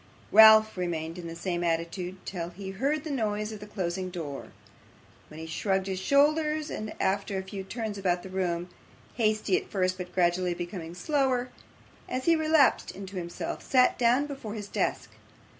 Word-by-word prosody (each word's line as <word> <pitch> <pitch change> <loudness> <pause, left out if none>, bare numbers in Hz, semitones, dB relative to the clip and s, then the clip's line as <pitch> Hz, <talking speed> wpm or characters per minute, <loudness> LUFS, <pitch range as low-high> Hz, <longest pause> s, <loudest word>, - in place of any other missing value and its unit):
Ralph 220 0 +8
remained 165 -1 -3
in 170 - -7
the 165 - -7
same 175 0 -2
attitude 170 +2 -2
till 175 -3 -4
he 190 +2 -7
heard 275 +9 -1
the 315 - -5
noise 215 -4 -1
of 215 - -7
the 210 - -9
closing 185 -2 -3
door, 155 -6 -6 0.8
when 155 - -11
he 160 - -6
shrugged 190 +4 -1
his 190 -1 -3
shoulders, 300 +6 +2
and 215 0 -6
after 200 0 0
a 190 - -3
few 190 0 -6
turns 215 0 -5
about 180 -2 0
the 190 - -8
room 180 -2 -2 0.5
hasty 215 -4 +2
at - - -6
first, 185 -2 0
but 180 0 -6
gradually 175 0 +1
becoming 175 -1 -6
slower, 260 - 0 0.6
as 255 0 -3
he 335 - +5
relapsed 315 -3 +3
into 195 0 -8
himself 170 -1 -5
sat 255 -1 +3
down 245 +4 +4
before 270 -7 -6
his 205 -2 -6
desk. - - -2
195 Hz, 175 wpm, -28 LUFS, 175-230 Hz, 0.8 s, Ralph